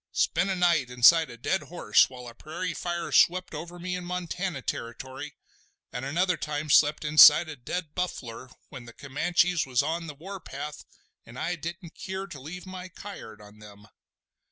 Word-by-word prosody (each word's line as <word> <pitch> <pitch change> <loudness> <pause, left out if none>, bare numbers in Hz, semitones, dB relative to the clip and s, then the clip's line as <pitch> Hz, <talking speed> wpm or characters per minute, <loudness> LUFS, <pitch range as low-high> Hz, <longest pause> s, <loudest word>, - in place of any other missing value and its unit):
Spent 180 +4 +1
a 190 - 0
night 170 -8 +2
inside 125 +6 +6
a 120 - -10
dead 190 +11 -1
horse 175 - +2
while 125 -1 -10
a 120 - -9
prairie 165 +7 -5
fire 175 -1 -4
swept 185 0 +3
over 170 +3 -7
me 180 +1 -4
in 180 - -5
Montana 180 -3 -4
Territory—an' 130 +1 -8
another 170 +6 +1
time 150 0 -3
slept 150 +1 +4
inside 150 +2 +8
a 160 - -7
dead 150 +5 -5
buffler 130 -9 -5 0.2
when 130 -5 -10
the 115 - -12
Comanches 165 +5 0
was 130 +1 +2
on 165 +2 -3
the 150 - -8
war 190 +6 -8
path 150 -2 -8 0.4
an' 120 +2 -13
I 180 - -2
didn't 170 +2 -7
keer 190 0 -5
to 175 -8 -10
leave 165 +8 -8
my 185 0 -8
kyard 140 - -10
on 105 +1 -15
them. 105 -1 -14
160 Hz, 175 wpm, -27 LUFS, 130-180 Hz, 0.4 s, inside